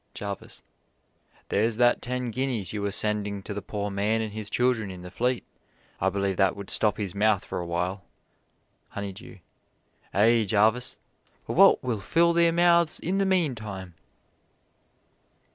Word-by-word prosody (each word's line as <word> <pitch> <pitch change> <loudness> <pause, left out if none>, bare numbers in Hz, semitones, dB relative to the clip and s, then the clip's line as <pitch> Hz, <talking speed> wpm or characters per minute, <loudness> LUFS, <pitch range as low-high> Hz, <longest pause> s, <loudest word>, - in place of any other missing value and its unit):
Jarvis: 100 -1 -7 0.9
There's 110 +2 +1
that 120 0 +3
ten 125 -1 -3
guineas 120 -6 -2
you 105 - -3
were 100 - -1
sending 105 -1 -1
to 105 - -6
the 105 - -5
poor 100 0 -4
man 105 +3 0
and 110 -2 -4
his 110 -1 -5
children 120 -3 +1
in 90 -1 -9
the 90 - -9
Fleet. 125 +4 -1 0.6
I - - +2
believe 100 -1 -1
that 95 -3 +3
would 100 -1 -5
stop 105 -2 +2
his 100 -4 -4
mouth 105 -1 +2
for - - -4
a 85 - -5
while. 90 +3 -2 0.9
Honeydew: 100 -2 -8 0.7
Ay, 110 +2 +3
Jarvis; 110 +5 +2 0.5
but - - -4
what - - +6
will 120 -4 -1
fill 170 - +2
their 170 0 +4
mouths 170 -1 +3
in 190 +4 -1
the 195 - +2
meantime? 110 - -1
105 Hz, 155 wpm, -26 LUFS, 100-125 Hz, 0.9 s, what